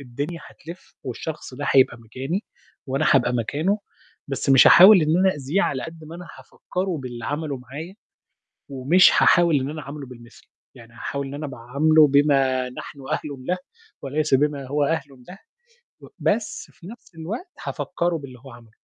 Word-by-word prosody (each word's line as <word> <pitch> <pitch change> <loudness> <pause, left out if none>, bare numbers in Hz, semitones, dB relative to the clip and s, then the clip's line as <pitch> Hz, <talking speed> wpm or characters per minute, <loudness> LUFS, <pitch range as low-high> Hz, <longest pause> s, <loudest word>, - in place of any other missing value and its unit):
الدنيا 140 +6 -6
هتلِف 170 +3 -13
والشخص 140 +2 -6
ده 145 +3 -5
هيبقى 130 -3 +4
مكاني، 135 - -5 0.4
وأنا 135 +3 0
هابقى 130 -2 +3
مكانه 150 - -1 0.5
بس 135 0 -2
مش 135 -1 +7
هاحاول 190 0 +9
إن 155 +2 +2
أنا 190 +1 +4
أأذيه 145 +7 -1
على 130 -9 -1
قد 160 +1 -9
ما 160 +2 -10
أنا 175 0 -9
هافكّره 185 -2 -5
باللي 120 -2 -7
عمله 145 +1 -3
معايا، 145 +9 -9 0.8
ومش 140 +8 +5
هاحاول 170 -4 +4
إن 135 +2 -3
أنا 155 0 -6
أعامله 145 0 -8
بالمِثل، 120 -2 -15 0.3
يعني 115 -1 -15
هاحاول 140 +4 -5
إن 135 - -8
أنا 150 +1 -5
باعامله 140 +5 +3
بما 135 -3 +2
نحن 140 +3 -10
أهلٌ 140 -4 -4
له 180 - 0 0.4
وليس 150 +1 -2
بما 140 0 +1
هو 145 +2 0
أهلٌ 140 -4 -3
له، 185 - -10 0.6
و - - -13
بس 215 +1 -2
في 170 - -16
نَفْس 220 -2 -13
الوقت 195 - -6 0.2
هافكّروا 175 -2 -2
باللي 135 -4 -11
هو 135 - -11
عمله. 115 -2 -15
145 Hz, 165 wpm, -23 LUFS, 130-165 Hz, 0.8 s, هاحاول